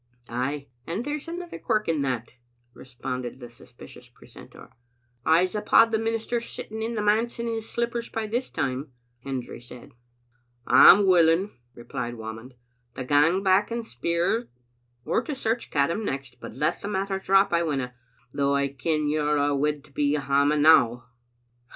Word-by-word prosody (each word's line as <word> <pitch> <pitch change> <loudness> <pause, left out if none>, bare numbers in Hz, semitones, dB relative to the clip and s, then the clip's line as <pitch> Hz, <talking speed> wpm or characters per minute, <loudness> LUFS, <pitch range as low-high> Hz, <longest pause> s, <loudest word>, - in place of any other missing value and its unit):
"Ay, 135 +4 -3 0.2
and 185 +8 -3
there's 295 +3 -4
another 345 +1 -7
quirk 215 -3 0
in 160 -3 0
that," 125 -4 -2 0.4
responded 125 0 -6
the 120 -2 -10
suspicious 120 - -14
precentor. - - -15 0.6
"I'seuphaud 185 +7 +4
the 220 - +1
minister's 225 +1 -2
sitting 220 +1 -6
in 230 +1 -3
the 210 - -1
manse 220 +3 +1
in 235 - -3
his 225 -1 -4
slippers 235 0 -2
by 225 -1 -3
this 240 +4 -2
time," 130 +1 -3 0.3
Hendry 125 -2 -6
said. 125 +3 -13 0.5
" 120 - -43 0.2
I'm 200 +2 +8
willing," 180 +1 +4 0.2
replied 120 0 -5
Whamond, 110 +3 -9 0.4
"to 130 - -4
gang 150 +8 +3
back 190 +2 +3
and 235 0 -4
speir, 170 - -1 0.6
or - - +1
to 280 +4 -5
search 230 -2 -2
Caddam 165 +9 0
next; 135 -7 -5
but - - -9
let 150 +4 -1
the - - -5
matter 195 -1 -2
drop 195 0 +3
I 170 - +3
winna, 135 -6 -2 0.4
though 140 0 +1
I 140 0 +1
ken 150 +3 -1
you're 150 0 +1
a' 145 0 +2
awid 145 0 0
to - - -21
be 145 +1 0
hame 145 +1 +2
now." 125 -6 +4
155 Hz, 160 wpm, -25 LUFS, 135-215 Hz, 0.6 s, I'm